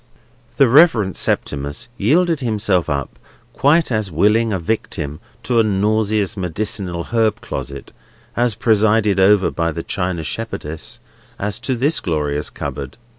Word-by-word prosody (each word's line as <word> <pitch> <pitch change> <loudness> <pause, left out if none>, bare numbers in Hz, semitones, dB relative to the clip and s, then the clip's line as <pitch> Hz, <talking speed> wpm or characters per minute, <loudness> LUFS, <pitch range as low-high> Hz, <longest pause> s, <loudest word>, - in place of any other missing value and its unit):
The 135 - +6
Reverend 120 - +5
Septimus 70 +11 -2
yielded 160 - +2
himself 105 - 0
up 70 -2 -3 0.3
quite 155 +1 +3
as 110 -3 -1
willing 105 +7 +2
a 95 - 0
victim 80 -6 -3 0.2
to 120 -2 +1
a - - +5
nauseous 105 -1 +1
medicinal 90 -1 -3
herb 110 -2 +2
closet, 70 -1 -7 0.4
also 120 -3 +1
presided 110 -2 +3
over 95 0 +4
by 85 0 -1
the 80 +1 -5
china 90 -3 -2
shepherdess, 80 -5 -5 0.4
as 105 +2 -3
to 130 +1 -1
this 140 +7 +1
glorious 75 -4 -2
cupboard. 70 +3 -6
105 Hz, 130 wpm, -19 LUFS, 85-115 Hz, 0.4 s, The